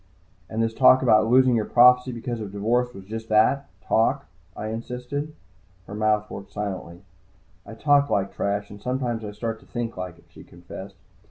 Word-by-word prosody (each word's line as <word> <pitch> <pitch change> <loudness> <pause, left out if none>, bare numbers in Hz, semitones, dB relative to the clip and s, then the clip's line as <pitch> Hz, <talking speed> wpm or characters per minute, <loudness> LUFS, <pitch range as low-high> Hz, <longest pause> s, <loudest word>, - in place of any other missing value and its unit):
"And 110 +1 -1
this 115 0 -1
talk 130 +2 +6
about 110 -3 +4
losing 130 0 +5
your 110 -2 0
prophecy 125 +1 +5
because 120 0 -5
of 105 -3 -6
divorce 120 +5 0
was 95 -5 -12
just 110 +2 -7
that, 110 +6 +3 0.2
talk?" 135 +5 +1 0.3
I 110 - -4
insisted. 125 +6 -5 0.5
Her 100 - -10
mouth 105 0 +1
worked 100 - -9
silently. 95 -3 -6 0.6
"I 110 - -9
talk 145 +4 +3
like 100 -1 0
trash, 100 0 -2
and 100 0 -11
sometimes 125 -3 -2
I 105 - -5
start 110 +2 -4
to - - -21
think 120 -3 -4
like 90 -2 -6
it," - - -22
she - - -14
confessed. 95 +3 -11
115 Hz, 180 wpm, -24 LUFS, 105-125 Hz, 0.6 s, talk